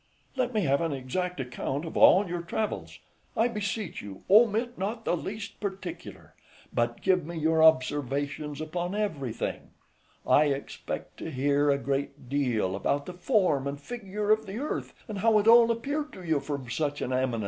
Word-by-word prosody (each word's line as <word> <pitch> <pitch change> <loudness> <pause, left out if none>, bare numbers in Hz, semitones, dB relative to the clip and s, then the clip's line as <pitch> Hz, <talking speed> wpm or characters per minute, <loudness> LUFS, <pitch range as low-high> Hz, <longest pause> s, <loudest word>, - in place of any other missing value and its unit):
Let 255 -2 0
me 215 -3 +1
have 140 -3 +2
an 165 -3 0
exact 160 +7 -3
account 130 +4 -3
of 160 - -7
all 195 +2 +6
your 175 0 -3
travels, 210 +5 -3 0.4
I 225 - +4
beseech 210 -4 -3
you, 100 -2 -10
omit 230 +3 +5
not 220 +4 -4
the - - +2
least 200 +5 -6
particular, 190 -3 -6 0.4
but 120 0 -1
give 185 -2 +3
me 170 +2 -6
your 160 0 +2
observations 145 0 +2
upon 175 +4 -3
everything; 150 - -3 0.6
I 150 - +5
expect 140 -1 -4
to - - -5
hear 145 +1 +2
a 140 - +4
great 140 0 -3
deal 120 -9 0
about 140 +8 0
the 180 - -7
form 180 - +1
and 140 0 -4
figure 210 +2 -3
of 215 0 +2
the 195 +3 -5
earth, 290 +5 -4
and 210 -3 -5
how 220 +1 +4
it 210 +1 +2
all 230 0 +8
appeared 285 +6 -2
to 185 - -10
you 160 -4 +1
from 140 -2 -5
such 145 +4 -2
an 130 - -2
eminence. 130 -2 0
165 Hz, 175 wpm, -28 LUFS, 140-210 Hz, 0.6 s, all